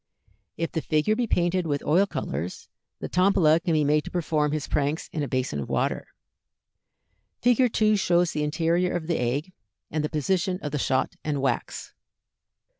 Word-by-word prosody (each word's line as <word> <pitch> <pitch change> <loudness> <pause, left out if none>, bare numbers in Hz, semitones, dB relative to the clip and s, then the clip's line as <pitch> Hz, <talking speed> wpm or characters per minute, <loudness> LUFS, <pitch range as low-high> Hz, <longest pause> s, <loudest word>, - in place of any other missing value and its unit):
If 165 0 -2
the 160 - -2
figure 155 +9 +1
be 240 +1 -1
painted 175 -2 +1
with 145 -2 -1
oil 185 +7 +3
colors, 90 - -5 0.3
the - - -3
Tombola 180 -4 +4
can 170 0 -1
be 155 -1 +3
made 150 +1 +2
to - - -5
perform 155 -4 0
his 155 -1 -2
pranks 150 +2 -1
in 155 - -2
a 145 - -1
basin 130 - -1
of 70 - -5
water. - - -1 1.4
Fig. 245 0 +4
2 215 -1 +3
shows 175 -2 +2
the 150 - -2
interior 165 +4 +1
of 170 -2 -3
the 170 0 -1
egg 140 +9 -2 0.4
and 155 0 -1
the 150 - -1
position 180 +4 0
of 145 - -3
the 150 - -2
shot 130 0 0
and 150 -2 -1
wax. 130 -3 -2
160 Hz, 180 wpm, -26 LUFS, 150-180 Hz, 1.4 s, Tombola